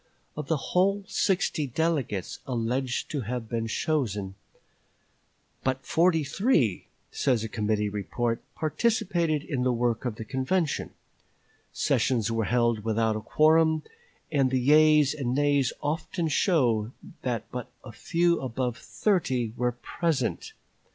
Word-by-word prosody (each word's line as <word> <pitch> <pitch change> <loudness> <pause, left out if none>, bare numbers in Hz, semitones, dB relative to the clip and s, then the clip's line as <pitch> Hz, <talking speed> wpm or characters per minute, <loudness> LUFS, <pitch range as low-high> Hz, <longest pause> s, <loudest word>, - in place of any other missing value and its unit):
Of 150 -2 -5
the 160 - +1
whole 195 +7 +1
sixty 180 -6 0
delegates 135 - -1
alleged 125 +1 -2
to 145 - -2
have 120 0 -4
been 115 0 -2
chosen, 110 - -1 1.3
"but 130 0 -1
forty 165 +1 +3
three," 145 - +1 0.2
says 120 -5 +1
a - - -2
Committee 105 -1 0
Report, 115 +3 -2
"participated 170 -4 0
in 135 -5 -3
the 125 0 +2
work 120 -1 0
of 120 -4 -2
the 110 - -7
convention. 140 +7 -1 0.8
Sessions 115 -4 +1
were 115 -1 0
held 120 -2 +1
without 110 0 +1
a 110 - -3
quorum, 160 +4 +3 0.5
and 135 -4 +3
the 130 0 +1
yeas 150 +2 +5
and 130 -4 -2
nays 145 -2 +2
often 160 +3 -2
show 125 - +2 0.3
that 120 -4 -2
but 125 -2 -6 0.2
few 170 0 +1
above 125 -1 -2
thirty 130 - 0
were 125 0 0
present. 135 +1 -2
130 Hz, 125 wpm, -27 LUFS, 115-155 Hz, 1.3 s, yeas